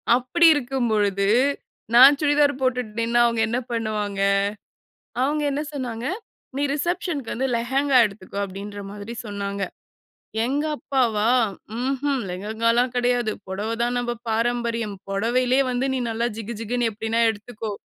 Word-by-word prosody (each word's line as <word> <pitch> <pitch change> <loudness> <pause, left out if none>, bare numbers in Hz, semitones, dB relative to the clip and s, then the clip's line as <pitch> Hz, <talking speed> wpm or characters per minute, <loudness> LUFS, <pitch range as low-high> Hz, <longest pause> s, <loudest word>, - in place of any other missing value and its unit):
அப்படி 255 +8 +2
இருக்கும் 265 -3 -1
பொழுது, 200 -2 +1 0.7
நான் 270 +4 +9
சுடிதார் 290 -2 +3
போட்டுட்டு 250 -3 0
நின்னா 235 +1 +2
அவங்க 230 -1 +1
என்ன 235 +2 -1
பண்ணுவாங்க? 210 -3 -2 1.0
அவங்க 295 +3 +1
என்ன 280 +2 -1
சொன்னாங்க, 245 -4 -4 0.5
"நீ 285 - 0
ரிசப்ஷன்க்கு 340 - -2
வந்து 265 +3 -1
லெஹெங்கா 265 +3 +2
எடுத்துக்கோ" 200 -1 -7
அப்படின்ற 200 +1 -7
மாதிரி 205 +3 -7
சொன்னாங்க, 200 -1 -4 0.8
எங்கள் 290 +4 -1
அப்பாவா? 230 -7 +1 0.5
ம்ஹம், 270 0 0
"லெகங்கால்லாம் 230 +6 0
கெடையாது. 245 -2 +1 0.2
பொடவை 205 +4 -3
தான் 245 +1 0
நம்ப 240 0 -2
பாரம்பரியம். 230 -1 -1 0.2
பொடவையிலயே 245 +6 +2
வந்து 250 +2 0
நீ 260 - -1
நல்லா 230 +1 0
ஜிகுஜிகுன்னு 230 +2 -2
எப்டினா 225 +2 -1
எடுத்துக்கோ" 215 0 -7
235 Hz, 125 wpm, -23 LUFS, 215-260 Hz, 1.0 s, நான்